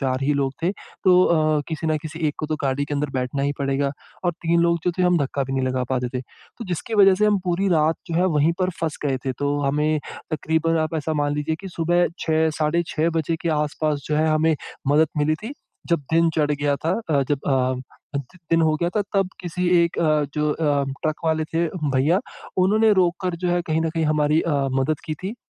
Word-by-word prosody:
4 130 Hz, -2 st, 0 dB
ही 145 Hz, +2 st, +2 dB
लोग 135 Hz, -1 st, 0 dB
थे। 175 Hz, -, +2 dB, 0.3 s
तो 180 Hz, -1 st, +6 dB
अ, 155 Hz, -2 st, +2 dB
किसी 160 Hz, 0 st, -3 dB
ना 155 Hz, -1 st, +2 dB
किसी 155 Hz, +1 st, -7 dB
एक 145 Hz, -, -4 dB
को 155 Hz, -, -3 dB
तो 155 Hz, 0 st, -2 dB
गाड़ी 140 Hz, +1 st, 0 dB
के 145 Hz, -, -4 dB
अंदर 145 Hz, 0 st, -1 dB
बैठना 130 Hz, +1 st, -2 dB
ही 140 Hz, +1 st, +1 dB
पड़ेगा 140 Hz, 0 st, 0 dB, 0.3 s
और 175 Hz, -, +2 dB
3 170 Hz, 0 st, +2 dB
लोग 170 Hz, 0 st, +3 dB
जो 180 Hz, -, +3 dB
थे -, -, +3 dB
हम 180 Hz, -1 st, +4 dB
धक्का 140 Hz, 0 st, -1 dB
भी 135 Hz, -, -5 dB
नहीं 135 Hz, -1 st, 0 dB
लगा 130 Hz, -1 st, -1 dB
पाते 125 Hz, -1 st, 0 dB
थे। -, -, -3 dB
तो 230 Hz, -, -13 dB
जिसकी 180 Hz, +6 st, -3 dB
वजह 195 Hz, -2 st, +7 dB
से 210 Hz, +3 st, +2 dB
हम 205 Hz, -1 st, +3 dB
पूरी 185 Hz, +2 st, +1 dB
रात 160 Hz, -2 st, +3 dB
जो -, -, -2 dB
है 180 Hz, -, +3 dB
वहीं 150 Hz, +3 st, +3 dB
पर 185 Hz, 0 st, +2 dB
फँस 160 Hz, -2 st, -2 dB
गए 135 Hz, -2 st, +1 dB
थे, 130 Hz, -, +1 dB
तो 145 Hz, +3 st, -1 dB
हमें 150 Hz, +2 st, +1 dB, 0.3 s
तकरीबन 160 Hz, +1 st, +1 dB
आप 155 Hz, +1 st, -1 dB
ऐसा 155 Hz, +1 st, -2 dB
मान 145 Hz, -1 st, 0 dB
लीजिए 155 Hz, +2 st, -1 dB
कि 195 Hz, -, -7 dB
सुबह 175 Hz, +1 st, +1 dB
6 160 Hz, 0 st, +1 dB
साढ़े 160 Hz, +2 st, +1 dB
6 160 Hz, +1 st, 0 dB
बजे 165 Hz, 0 st, 0 dB
के 170 Hz, -, -1 dB
आस-पास 150 Hz, 0 st, -1 dB
जो 150 Hz, -, +1 dB
है 155 Hz, +1 st, +2 dB
हमें 155 Hz, +1 st, +3 dB, 0.3 s
मदद 150 Hz, +2 st, +4 dB
मिली 155 Hz, +1 st, +2 dB
थी, 220 Hz, -, -7 dB, 0.4 s
जब 170 Hz, -2 st, +2 dB
दिन 165 Hz, 0 st, +4 dB
चढ़ 150 Hz, -2 st, +2 dB
गया 145 Hz, 0 st, 0 dB
था। 160 Hz, +4 st, -2 dB, 0.2 s
अ, 140 Hz, -2 st, +3 dB
जब 145 Hz, -, +1 dB
अ, 130 Hz, -1 st, +2 dB, 0.4 s
द 140 Hz, -, -1 dB, 0.3 s
दिन 165 Hz, 0 st, +4 dB
हो 155 Hz, -1 st, +3 dB
गया 170 Hz, -, +2 dB
था -, -, +3 dB
तब 195 Hz, -2 st, +2 dB
किसी 180 Hz, +1 st, -3 dB, 0.2 s
एक 170 Hz, -, -4 dB
अ, 155 Hz, -2 st, +2 dB
जो 150 Hz, 0 st, +1 dB
अ, 145 Hz, -3 st, +1 dB, 0.2 s
ट्रक 155 Hz, -1 st, +1 dB
वाले 160 Hz, -1 st, +1 dB
थे 165 Hz, +2 st, -1 dB, 0.3 s
भईया, 150 Hz, +9 st, +3 dB, 0.4 s
उन्होंने 215 Hz, +4 st, +4 dB
रोक 180 Hz, -3 st, +3 dB
कर 180 Hz, -2 st, -1 dB
जो -, -, +2 dB
है 175 Hz, 0 st, +2 dB
कहीं 160 Hz, 0 st, +1 dB
न 165 Hz, -, 0 dB
कहीं 165 Hz, -1 st, -1 dB
हमारी 150 Hz, +1 st, +2 dB
अ, 170 Hz, -, -1 dB, 0.3 s
मदद 150 Hz, +3 st, 0 dB
की 155 Hz, -3 st, -3 dB
थी। 205 Hz, +5 st, -3 dB
155 Hz, 240 wpm, -23 LUFS, 145-170 Hz, 0.4 s, वजह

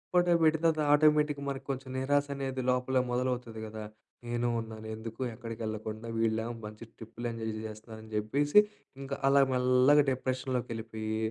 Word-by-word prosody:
Photo 175 Hz, -1 st, +5 dB
పెట్టిన 160 Hz, +1 st, +3 dB
తర్వాత 155 Hz, -, +1 dB
ఆటోమేటిక్‌గా 150 Hz, -1 st, +4 dB
మనకి 135 Hz, 0 st, -5 dB
కొంచెం 135 Hz, 0 st, -6 dB
నిరాశ 145 Hz, +2 st, +2 dB
అనేది 135 Hz, -1 st, -3 dB
లోపలే 125 Hz, +1 st, +1 dB
మొదలవుతది 125 Hz, -2 st, -2 dB
కదా! 110 Hz, 0 st, -7 dB, 0.4 s
నేను 120 Hz, 0 st, 0 dB
ఉన్నాను 110 Hz, -1 st, -7 dB
ఎందుకు 115 Hz, +2 st, -8 dB
ఎక్కడికి 115 Hz, +1 st, -7 dB
వెళ్ళకుండా, 110 Hz, +1 st, -5 dB
వీళ్ళేమో 115 Hz, +1 st, 0 dB
మంచి 105 Hz, +1 st, -9 dB
ట్రిప్పుల్లెంజాయ్ 115 Hz, 0 st, -5 dB
జేస్తున్నారని 110 Hz, 0 st, -9 dB
చెప్పేసి 140 Hz, -, +4 dB, 0.4 s
ఇంకా 135 Hz, 0 st, -4 dB
అలా 140 Hz, 0 st, +6 dB
మెల్లగా 130 Hz, +3 st, +5 dB
డిప్రెషన్‌లోకి 130 Hz, -1 st, -2 dB
ఎళ్ళిపోయి, 110 Hz, -1 st, -4 dB
125 Hz, 140 wpm, -30 LUFS, 110-135 Hz, 0.4 s, అలా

